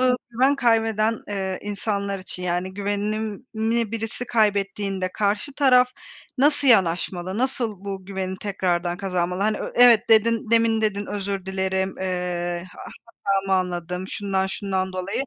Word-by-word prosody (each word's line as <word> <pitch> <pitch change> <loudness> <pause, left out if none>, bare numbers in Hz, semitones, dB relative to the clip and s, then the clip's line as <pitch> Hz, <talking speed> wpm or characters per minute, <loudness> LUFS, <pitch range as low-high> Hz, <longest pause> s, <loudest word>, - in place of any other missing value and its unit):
eee, 255 -1 +4 0.2
güven 260 +4 +3
kaybeden, 225 -3 +2
eee, 190 -2 -3
insanlar 200 -1 -2
için, 185 -1 -7
yani 180 +1 -2
güvenini 215 +3 -2
birisi 225 +2 -4
kaybettiğinde, 200 -3 0
karşı 210 +7 0
taraf 255 -3 +5 0.5
nasıl 290 0 +3
yanaşmalı; 185 -1 +2
nasıl 235 -6 -1
bu 195 -2 -5
güveni 190 -1 -4
tekrardan 175 -3 -1
kazanmalı? 180 -1 -1
Hani, 215 +1 +1
ö - - -5
evet 240 -2 +6
dedin; 225 0 +3
demin 230 -1 +3
dedin, 205 -2 -1
özür 195 -2 -4
dilerim, 190 0 -1
eee, 180 -2 -2
a - - -8 0.4
hatamı 195 0 +1
anladım, 180 +1 -4
şundan 195 -2 -1
şundan 190 -1 -2
dolayı. 185 +7 -2
200 Hz, 135 wpm, -23 LUFS, 190-225 Hz, 0.5 s, evet